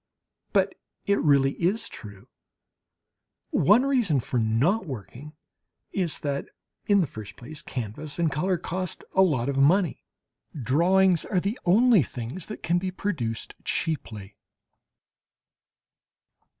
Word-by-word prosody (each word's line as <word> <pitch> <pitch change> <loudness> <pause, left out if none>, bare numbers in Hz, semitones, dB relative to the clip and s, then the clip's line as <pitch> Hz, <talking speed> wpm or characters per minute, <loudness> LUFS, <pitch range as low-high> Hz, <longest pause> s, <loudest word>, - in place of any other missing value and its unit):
But - - +2 0.3
it 200 0 +2
really 140 -2 +4
is 190 +7 0
true. 100 -4 -11 1.2
One 215 +7 +5
reason 240 - +2
for 125 +1 -2
not 135 - +1
working 130 - -8 0.6
is 175 -6 -1
that, 140 -1 -2 0.4
in 200 -1 +5
the - - +2
first 105 -6 -9
place, 150 +5 -7
canvas 125 +5 -6
and 165 -3 +1
colour 180 +6 0
cost 180 +1 -4
a 190 - +4
lot 140 -10 +2
of 140 -1 -1
money. 170 +5 +3 0.6
Drawings 175 +8 +3
are 185 - 0
the 200 +7 -3
only 220 +3 +5
things 125 +7 -6
that 215 - -8
can 175 +1 +2
be 185 +1 -2
produced 150 - -3
cheaply. 110 - -3
155 Hz, 125 wpm, -26 LUFS, 125-190 Hz, 1.2 s, One